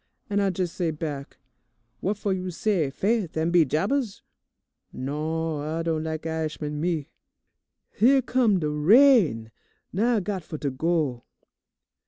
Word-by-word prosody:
and 205 0 +2
I 195 -1 +2
jes' 180 -2 -1
say 175 -2 -1
back, 150 -3 -5 0.6
'What 200 +2 -1
fo' 205 -1 -2
you 185 -1 -2
say 180 -4 0
"Faith 195 +2 -1
an' 160 +2 +1
be 170 -2 +5
jabers"?' 200 - -1 0.7
Non, 155 +3 -3
I 160 +2 -2
don' 160 -1 -1
lak 160 0 -4
I'ishman, 155 -2 -3
me! 165 -3 -2 0.8
"Here 265 +4 +4
come 235 -6 +2
de 155 - -1
rain! 160 - +4 0.4
Now 230 +6 +2
I - - +2
got 190 0 -3
fo' 155 -1 -7
to 140 -2 -2
go. 145 -3 -1
165 Hz, 145 wpm, -25 LUFS, 150-200 Hz, 0.8 s, be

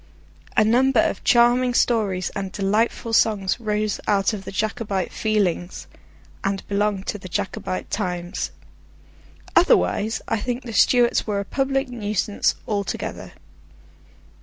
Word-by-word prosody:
A 215 - +7
number 250 +2 +3
of 200 - 0
charming 240 +1 +4
stories 200 -8 +1
and 195 -2 -4
delightful 215 +4 0
songs 205 -4 +2
arose 210 -2 -1
out 200 +1 +2
of 195 -2 -6
the - - -6
Jacobite 210 -2 -2
feelings, 200 -5 -1 0.6
and 195 0 -2
belong 205 -1 0
to 210 - -4
the 185 - -9
Jacobite 195 -1 -3
times. 180 -3 -3 1.1
Otherwise 225 - +3
I 225 - 0
think 245 +3 -3
the 230 - -7
Stuarts 240 +4 +3
were 205 -2 0
a 200 - -3
public 270 +4 0
nuisance 210 -4 -1
altogether. 205 -2 -4
210 Hz, 125 wpm, -23 LUFS, 195-235 Hz, 1.1 s, A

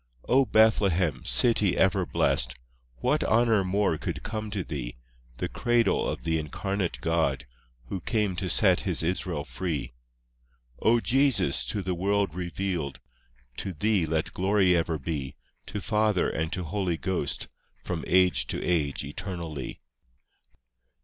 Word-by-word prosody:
V - - -25
O 135 +1 +5
Bethlehem, 95 - +3
city 110 -6 +3
ever 95 -2 +2
blest! - - +1 0.5
What - - +2
honour 110 -3 +3
more 95 -3 +1
could - - -4
come 110 -1 -4
to 100 -3 -2
thee? 65 -6 -5 0.4
The 90 - -2
cradle 120 +4 +1
of - - -4
the 80 -1 +1
Incarnate 95 +4 -2
God, 80 -6 0 0.4
Who 90 - -4
came 105 -4 0
to 95 -1 -2
set - - +4
His - - -2
Israel 90 -3 -1
free! 85 -7 -3
VI 65 - -9 1.0
O 120 +1 +5
Jesus, 130 - +2
to 100 +9 -2
the 90 0 -1
world 100 0 0
revealed! 90 -4 -3 0.6
To 95 - -3
Thee 100 0 +1
let 80 0 -1
glory 95 -1 +3
ever 80 -1 0
be, 70 -2 -4 0.3
To 105 - -4
Father 105 -1 +1
and 80 +1 -2
to 90 - -2
Holy 90 0 -1
Ghost, 95 +2 -2 0.4
From 85 -3 -3
age 90 0 +4
to - - -2
age 80 -6 0
eternally. 80 -2 -6
90 Hz, 145 wpm, -27 LUFS, 80-105 Hz, 1.0 s, O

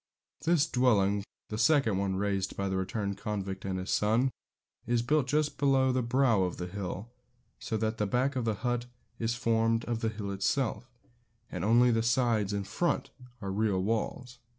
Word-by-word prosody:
This 165 -3 +4
dwelling, 105 -8 +2 0.3
the 105 - -4
second 135 -11 +3
one 100 -1 0
raised 100 -1 -1
by 100 - -1
the 95 - -1
returned 100 +1 -2
convict 100 -2 -4
and 95 -1 -2
his 95 0 -4
son, 115 +5 +2 0.6
is 120 -1 +1
built 145 +1 +2
just 150 +2 0
below 135 -2 +3
the 130 0 +1
brow 120 -3 +3
of 90 -1 -1
the 90 - -4
hill, 100 +4 -5 0.5
so 110 - -2
that 110 +1 -2
the 105 - +1
back 130 +6 +1
of 125 - 0
the 110 -2 0
hut 120 0 0 0.3
is 115 +1 0
formed 115 -1 +1
of 120 -1 -2
the 115 - 0
hill 105 -2 -5
itself, 110 +4 -1 0.6
and 90 - -4
only 120 +4 +5
the 115 -1 +2
sides 115 -4 +2
and 100 -1 -3
front 175 +9 -1 0.3
are 100 - -3
real 100 -1 +1
walls. 120 +3 -2
115 Hz, 180 wpm, -30 LUFS, 100-125 Hz, 0.6 s, only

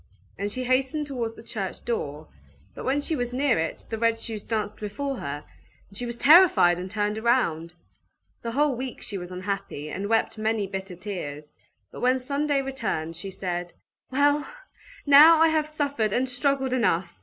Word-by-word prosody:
And 205 +1 -3
she 255 +4 -3
hastened 265 +4 +1
towards 240 -5 -4
the - - -12
church 195 -4 -5
door: 155 -10 -3 0.5
but - - -8
when 275 +3 +1
she 315 - -2
was 245 -3 -2
near 265 - +2
it, 160 0 -3
the 225 - -4
red 230 0 +2
shoes 220 -3 -5
danced 215 -2 -3
before 265 +6 -4
her, 145 -3 -5 0.4
and 200 - -17
she 245 +4 -3
was 235 0 -5
terrified, 285 - +6
and 185 +1 -5
turned 210 +1 -1
round. 175 -9 +1 0.7
The 230 - -4
whole 290 +1 +2
week 255 +1 -6
she 200 -2 -4
was 175 0 -7
unhappy, 185 -5 -4
and 200 +2 -4
wept 225 -1 +1
many 220 -1 0
bitter 190 -1 -6
tears; 155 -6 -6 0.4
but - - -9
when 255 +1 +3
Sunday 280 +2 0
returned, 220 -12 -3
she 180 +4 -6
said, 175 -2 -4 0.4
"Well, 290 +2 +2 0.6
now 300 +3 +9
I 325 +1 +5
have 310 -1 +1
suffered 285 -8 -1
and 255 +2 +1
struggled 265 +1 0
enough! 185 -8 0
230 Hz, 180 wpm, -26 LUFS, 190-270 Hz, 0.7 s, now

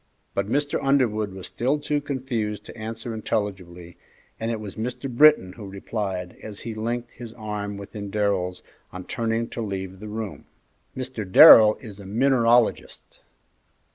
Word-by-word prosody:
But 100 +1 -2
Mr. 145 +3 0
Underwood 115 -7 +1
was 95 -1 -7
still 130 +5 0
too 145 0 -1
confused 125 -7 -3
to - - -11
answer 115 +1 -6
intelligibly, 90 -5 -4 0.4
and 115 - -2
it 115 -2 -2
was 105 -2 -8
Mr. 125 +4 -4
Britton 130 -7 +5
who 105 -2 -9
replied, 95 -2 -4
as 105 -2 -6
he 115 - -5
linked 120 +2 -3
his 115 -2 -10
arm 105 -2 -5
within 100 0 -7
Darrell's 100 -3 -1 0.3
on 90 0 -7
turning 115 +3 -2
to - - -5
leave 95 -3 -5
the 105 - -8
room, 110 -1 -6 0.5
"Mr. 130 -4 -4
Darrell 110 +2 +10
is 105 -5 -10
a 100 - -10
mineralogist." 120 +1 +1
110 Hz, 150 wpm, -24 LUFS, 100-120 Hz, 0.5 s, Darrell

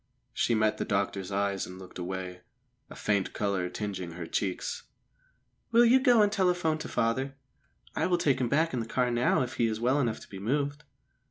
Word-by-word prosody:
She 120 - +1
met 110 0 +1
the - - +1
doctor's 100 -1 -1
eyes 100 0 -1
and 90 - -9
looked 95 -1 -10
away, 90 0 -5 0.5
a - - -10
faint 100 -3 0
colour 100 -3 -1
tingeing 95 -3 -5
her 85 0 -6
cheeks. 95 +2 -2 0.9
"Will 235 +1 +6
you 250 +3 +6
go 245 -5 +5
and 205 - +2
telephone 180 -5 +1
to - - -6
father? 130 +4 0 0.6
I - - +1
will 180 -1 +2
take 140 -6 +1
him 120 - +1
back 160 +4 +2
in 125 - 0
the 115 - -3
car 125 +1 +1
now 120 +2 +2
if 125 - -6
he 115 - +3
is 110 -1 -2
well 130 +5 +2
enough 120 -5 0
to - - -12
be 95 - -9
moved." 145 +6 -1
115 Hz, 200 wpm, -29 LUFS, 100-145 Hz, 0.9 s, Will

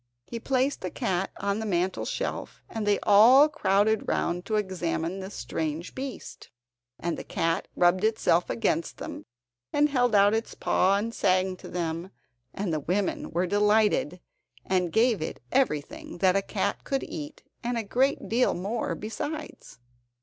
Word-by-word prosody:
He 235 - -6
placed 265 +3 0
the 185 - -3
cat 185 +2 -1
on 200 +1 -1
the 220 - -3
mantel 185 -1 0
shelf, - - -4
and 220 -2 -4
they 205 -1 +4
all 240 +8 +7
crowded 220 -7 +1
round 175 +2 -1
to 220 - 0
examine 185 -3 -2
this 190 +2 -7
strange 160 +2 -4
beast, 265 0 -7 0.5
and 170 -1 -2
the - - -6
cat 165 0 -1
rubbed 180 +2 +3
itself 215 -6 +2
against 170 -8 -1
them, - - -7 0.5
and 295 +1 +3
held 245 -5 +2
out 200 +1 +5
its 225 +1 -2
paw, 190 +2 +2
and 225 +3 -3
sang 185 -2 +1
to - - -11
them; 170 0 -3 0.4
and 195 0 -3
the 155 - 0
women 185 +7 -1
were 175 +2 0
delighted, 205 -3 +2 0.5
and 180 -2 +1
gave 225 -3 +3
it 155 - -4
everything 295 - -1
that 185 -1 +3
a 195 - +3
cat - - -2
could 275 -1 -1
eat, 150 -2 -7 0.2
and 240 0 -1
a 230 - -1
great 260 +7 +1
deal 240 +3 +2
more 205 +6 -2
besides. 290 - -6
200 Hz, 160 wpm, -27 LUFS, 180-230 Hz, 0.5 s, all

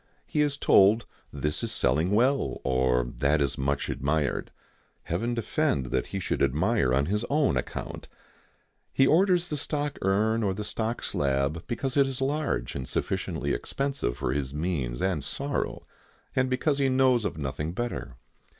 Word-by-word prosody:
He 150 - 0
is 145 -1 +1
told 105 0 +5 0.3
this 75 +1 -2
is - - -2
selling 75 +8 +1
well, 115 - +2
or 65 -1 +2
that 70 +3 +3
is 70 -3 +1
much 70 +1 -1
admired. 70 0 -1 0.5
Heaven 115 +8 -2
defend 70 - 0
that - - 0
he 95 - -4
should - - -2
admire 75 - +2
on 70 +2 +2
his 105 +6 0
own 145 - +2
account! 60 - -4 0.8
He 135 - +4
orders 180 +3 +3
the 150 - -2
stock 145 0 -2
urn 110 +4 +2
or 100 -3 0
the 105 - -4
stock 110 +2 -3
slab 70 +4 -1
because 130 +3 -2
it 140 -1 +5
is 135 -2 -4
large 140 - -1
and 65 -2 -4
sufficiently - - -2
expensive 140 - -2
for - - -1
his 70 -1 -3
means 75 -7 -2
and 90 -7 0
sorrow, 140 - -2 0.5
and 130 0 +2
because 140 +3 +1
he 135 -1 +3
knows 130 -2 +3
of 100 - -3
nothing 75 +2 -3
better. 70 - -4
95 Hz, 160 wpm, -27 LUFS, -, 0.8 s, told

